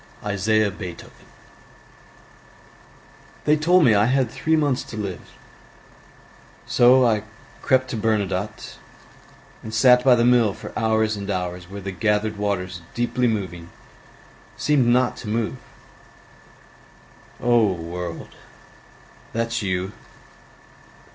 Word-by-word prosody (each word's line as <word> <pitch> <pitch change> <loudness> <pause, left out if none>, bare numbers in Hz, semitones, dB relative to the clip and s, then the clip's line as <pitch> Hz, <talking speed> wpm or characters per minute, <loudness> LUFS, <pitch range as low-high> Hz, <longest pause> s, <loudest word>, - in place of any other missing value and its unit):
Isaiah 105 +1 +1
Beethoven 90 -3 -10 2.2
They 150 - +4
told 170 +3 +3
me 115 - +5
I 105 +1 +3
had 130 -2 +1
three 160 0 0
months 145 -5 +1
to 110 - -9
live, 100 -4 -7 1.3
So 125 +1 +5
I 110 -3 +2 0.4
crept 130 -1 +1
to 115 - -3
Bernadotte, 105 -1 -2 0.8
And 110 - -8
sat 125 +3 +5
by 130 -1 +6
the 120 0 +2
mill 120 -5 +3
for - - -10
hours 110 -1 +1
and 100 0 -6
hours 90 -2 -4
Where 100 +1 -8
the 95 0 -5
gathered 105 +3 0
waters 90 -3 -3
deeply 120 +1 0
moving 90 -6 -4 0.9
Seemed 145 -5 +2
not 125 +1 +2
to 115 - -9
move: 115 +3 -2 1.8
O 120 -1 +3
world, 85 0 -6 1.0
that's 115 +1 -1
you! 95 -1 -2
110 Hz, 110 wpm, -22 LUFS, 95-120 Hz, 2.2 s, by